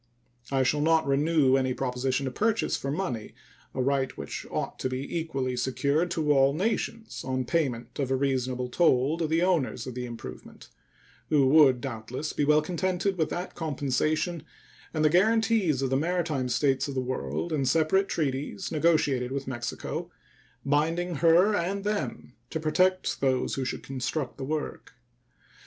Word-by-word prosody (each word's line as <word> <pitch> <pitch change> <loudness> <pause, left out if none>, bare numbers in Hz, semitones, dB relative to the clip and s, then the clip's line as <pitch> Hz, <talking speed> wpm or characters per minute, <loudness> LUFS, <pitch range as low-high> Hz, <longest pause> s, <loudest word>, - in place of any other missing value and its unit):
I 135 -1 +2
shall 145 +3 +1
not 160 0 +3
renew 140 -1 +3
any 130 -1 0
proposition 130 +1 -1
to 130 - -2
purchase 225 - +1
for 135 - -4
money 135 - -3 0.4
a 130 - 0
right 135 -1 0
which - - -6
ought - - -3
to 130 - -1
be 130 +4 -4
equally 135 -6 -2
secured 140 +6 0
to 160 -4 0
all 135 0 +4
nations 225 +4 -2
on 130 -1 -2
payment 125 -4 -1
of 135 -2 0
a 135 - +2
reasonable 130 -2 -1
toll 140 +2 +2
to 165 - 0
the 165 +2 +2
owners 160 -9 0
of 130 - -6
the 125 0 -4
improvement, 115 - -10 0.6
who 145 -3 +4
would 135 -4 +6
doubtless 125 +3 -5
be - - 0
well 150 +1 +4
contented 185 +3 -1
with 160 -3 0
that 180 +1 -4
compensation 155 +2 -1 0.5
and 155 -1 0
the - - +6
guaranties 210 - +3
of 135 - -1
the 135 - +3
maritime 160 -5 -1
states 135 +1 +1
of 140 - -5
the - - +1
world 130 +6 -3
in 145 -3 +1
separate 160 +8 +2
treaties 145 +4 -2
negotiated 150 -6 +2
with 135 0 -3
Mexico, 120 -2 -4 0.6
binding 165 +4 +1
her 170 +7 +5
and 195 +2 -1
them 210 0 -3 0.2
to 160 - -3
protect 185 +4 +1
those 130 -2 +1
who 135 - -1
should 125 - -4
construct 135 +1 -3
the 135 - -3
work. 155 +2 -4
145 Hz, 165 wpm, -27 LUFS, 130-165 Hz, 0.6 s, would